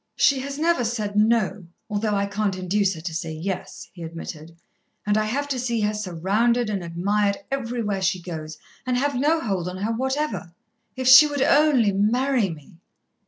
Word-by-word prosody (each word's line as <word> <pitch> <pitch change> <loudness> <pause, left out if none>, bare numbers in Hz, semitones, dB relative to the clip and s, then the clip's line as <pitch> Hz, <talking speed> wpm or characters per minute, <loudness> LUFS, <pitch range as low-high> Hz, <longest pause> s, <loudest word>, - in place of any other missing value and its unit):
"She 275 -2 +3
has 275 +1 -5
never 325 -4 +2
said 215 -3 -2
no, 210 -4 +1 0.2
although 210 0 -1
I 200 0 +1
can't 200 -1 -2
induce 190 +1 0
her 160 - -9
to 165 0 -5
say 160 0 -4
yes," 180 +4 -5
he 175 - -12
admitted; 165 0 -8 0.5
"and 210 0 +1
I 215 0 +2
have 280 +7 -2
to 265 -2 -1
see 235 -2 -1
her 210 0 +1
surrounded 210 +5 0
and 195 -3 -3
admired 200 +4 0
everywhere 230 -6 -2
she 185 0 +1
goes, 160 -3 -7 0.3
and 255 -1 0
have 285 +2 0
no 295 +6 +2
hold 190 -6 -2
on 180 - -7
her 205 +4 -2
whatever. 260 - -2 0.4
If 260 -1 -3
she 260 +4 +10
would 285 -2 -1
only 285 -9 +4
marry 230 +3 +1
me!" 160 0 -11
210 Hz, 180 wpm, -23 LUFS, 185-250 Hz, 0.5 s, she